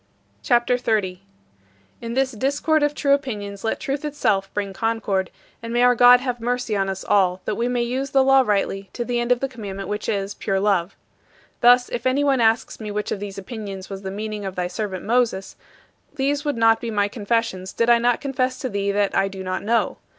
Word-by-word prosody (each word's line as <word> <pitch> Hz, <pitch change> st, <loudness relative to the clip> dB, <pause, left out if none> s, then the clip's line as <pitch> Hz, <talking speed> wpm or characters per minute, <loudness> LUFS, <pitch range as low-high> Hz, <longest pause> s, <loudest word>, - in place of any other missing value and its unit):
CHAPTER 240 Hz, -, +2 dB
XXX 245 Hz, -, -16 dB
41. 190 Hz, -5 st, 0 dB, 0.8 s
In 230 Hz, 0 st, -5 dB
this 265 Hz, 0 st, +1 dB
discord 280 Hz, +6 st, +1 dB
of 295 Hz, 0 st, +1 dB
true 280 Hz, -1 st, +2 dB
opinions 205 Hz, -8 st, -3 dB
let 225 Hz, -, -1 dB
Truth 275 Hz, +2 st, -3 dB
itself 210 Hz, -10 st, 0 dB
bring 200 Hz, -2 st, -3 dB
concord, 205 Hz, -4 st, -1 dB, 0.3 s
and 230 Hz, 0 st, -6 dB
may 240 Hz, +1 st, +2 dB
our 250 Hz, 0 st, +6 dB
God 245 Hz, +1 st, +7 dB
have 250 Hz, -2 st, -3 dB
mercy 245 Hz, -2 st, -1 dB
on 195 Hz, -1 st, 0 dB
us 190 Hz, 0 st, -4 dB
all, 185 Hz, -2 st, +2 dB
that -, -, -1 dB
we 235 Hz, +3 st, -1 dB
may 245 Hz, -1 st, 0 dB
use 260 Hz, +3 st, -2 dB
the 270 Hz, 0 st, +4 dB
law 270 Hz, 0 st, +6 dB
rightly 195 Hz, -4 st, -1 dB
to 240 Hz, -, -3 dB
the 240 Hz, 0 st, -1 dB
end 240 Hz, +1 st, -1 dB
of 245 Hz, -, +3 dB
the 270 Hz, -, 0 dB
commandment 200 Hz, -7 st, -7 dB
which 210 Hz, 0 st, -3 dB
is 200 Hz, 0 st, -2 dB
pure 195 Hz, -1 st, -1 dB
love. 195 Hz, -2 st, +1 dB, 0.6 s
Thus, 245 Hz, +1 st, +6 dB
if 240 Hz, -, -2 dB
anyone 275 Hz, -1 st, +2 dB
asks 225 Hz, 0 st, +1 dB
me 215 Hz, -2 st, -6 dB
which 210 Hz, 0 st, -3 dB
of -, -, -2 dB
these 200 Hz, -1 st, -7 dB
opinions 195 Hz, -2 st, -7 dB
was 195 Hz, 0 st, -6 dB
the 190 Hz, -, -5 dB
meaning 210 Hz, +1 st, -5 dB
of 190 Hz, -1 st, -5 dB
thy 180 Hz, -, -1 dB
servant 185 Hz, +1 st, -4 dB
Moses, 230 Hz, -4 st, 0 dB, 0.6 s
these 285 Hz, +1 st, 0 dB
would 290 Hz, -4 st, -2 dB
not 225 Hz, 0 st, +4 dB
be 235 Hz, -, -4 dB
my 205 Hz, -2 st, +1 dB
confessions 205 Hz, -3 st, -2 dB
did 230 Hz, -, 0 dB
I 235 Hz, 0 st, +6 dB
not 240 Hz, 0 st, +1 dB
confess 255 Hz, -2 st, -1 dB
to 255 Hz, -, -4 dB
thee 200 Hz, -1 st, -1 dB
that 200 Hz, 0 st, 0 dB
I 195 Hz, -, +3 dB
do 195 Hz, -1 st, -7 dB
not 185 Hz, 0 st, -3 dB
know. 230 Hz, +2 st, 0 dB
225 Hz, 215 wpm, -22 LUFS, 200-250 Hz, 0.8 s, God